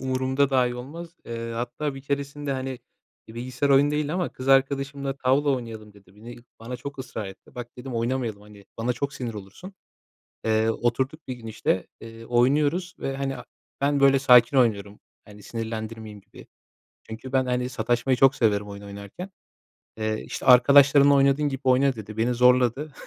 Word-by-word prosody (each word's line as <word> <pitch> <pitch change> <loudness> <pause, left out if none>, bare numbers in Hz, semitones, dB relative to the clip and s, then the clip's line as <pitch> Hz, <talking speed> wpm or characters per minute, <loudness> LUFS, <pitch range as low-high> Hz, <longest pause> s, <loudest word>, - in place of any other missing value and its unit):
umurumda 130 +1 0
dahi 125 -2 +2
olmaz. 165 +8 -9
Eee, 115 0 -5
hatta 125 +5 -3
bir 135 - -10
keresinde, 140 0 -3
hani, 130 -1 -4 0.5
bir 110 - -12
bilgisayar 125 +3 -2
oyunu 140 +1 +5
değildi 150 0 -1
ama 180 -1 -1
kız 130 +1 -7
arkadaşımla, 135 0 +1
"Tavla 135 +3 +2
oynayalım." 115 -5 -5
dedi, 100 -1 -21
beni 120 +3 -11 0.2
bana 125 +2 -6
çok 140 +3 -8
ısrar 110 -5 -6
etti. 95 0 -13
“Bak,” 120 0 -8
dedim, 125 0 -7
“oynamayalım, 115 -3 -2
hani, 105 -1 -16
bana 120 +2 0
çok 140 +3 -4
sinir 120 -3 -5
olursun.” 105 - -10 0.7
Eee, 110 0 +2
oturduk 130 +7 -2
bir 130 - -3
gün, 120 -2 -12
işte, 110 -4 -1
eee, 115 0 -11
oynuyoruz 145 +9 +1
ve, 135 0 -4
hani, 135 -1 -3
a 125 - -10 0.4
ben, 140 0 +1
böyle, 135 0 +5
sakin 125 -1 +5
oynuyorum. 105 -4 +1 0.2
Hani, 105 0 -15
sinirlendirmeyeyim 110 -1 -6
gibi. - - -16 0.6
Çünkü 115 +4 -9
ben, 130 -1 +2
hani, 125 0 -1
sataşmayı 125 0 0
çok 135 +2 +5
severim 105 -5 +1
oyun 100 0 -9
oynarken. 100 - -9 0.7
Eee, 110 0 -2
işte, - - -7
“Arkadaşlarınla 140 +3 +7
oynadığın 140 +1 +3
gibi 135 0 -5
oyna.” 130 +1 +3
dedi. 110 0 -9
Beni 120 +2 +1
zorladı. 125 +4 +3
125 Hz, 170 wpm, -25 LUFS, 115-140 Hz, 0.7 s, Arkadaşlarınla